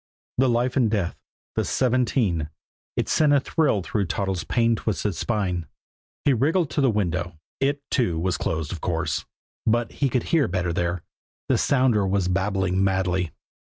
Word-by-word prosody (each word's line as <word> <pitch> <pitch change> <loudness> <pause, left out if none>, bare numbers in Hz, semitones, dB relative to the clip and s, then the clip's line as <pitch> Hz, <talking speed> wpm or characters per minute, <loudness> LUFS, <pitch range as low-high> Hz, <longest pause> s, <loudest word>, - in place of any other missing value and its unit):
The 130 -1 +4
life 120 +2 +1
and 125 -5 +3
death 100 -5 -1 0.4
the - - +1
seventeen 120 - +1 0.5
it - - 0
sent 150 -2 +3
a 140 - +6
thrill 135 - +1
through 100 +2 -1
Toddles' 95 +2 -2
pain 115 -1 +2
twisted 105 -2 -1
spine. 90 -4 -1 0.6
He 140 - +5
wriggled 155 +7 +1
to 145 - 0
the 135 - +4
window. 90 -5 -1 0.2
It, 140 +1 0
too, 115 -11 +1
was 90 +2 0
closed, 80 -2 -2
of 85 - -5
course, - - -1 0.4
but 120 +1 +2
he 140 - 0
could 125 -2 0
hear 160 -7 +2
better 90 -1 -1
there. 85 0 -1 0.5
The - - +4
sounder 125 -7 +3
was 95 -1 +1
babbling 95 0 +1
madly. 95 -2 +1
105 Hz, 160 wpm, -24 LUFS, 90-125 Hz, 0.6 s, a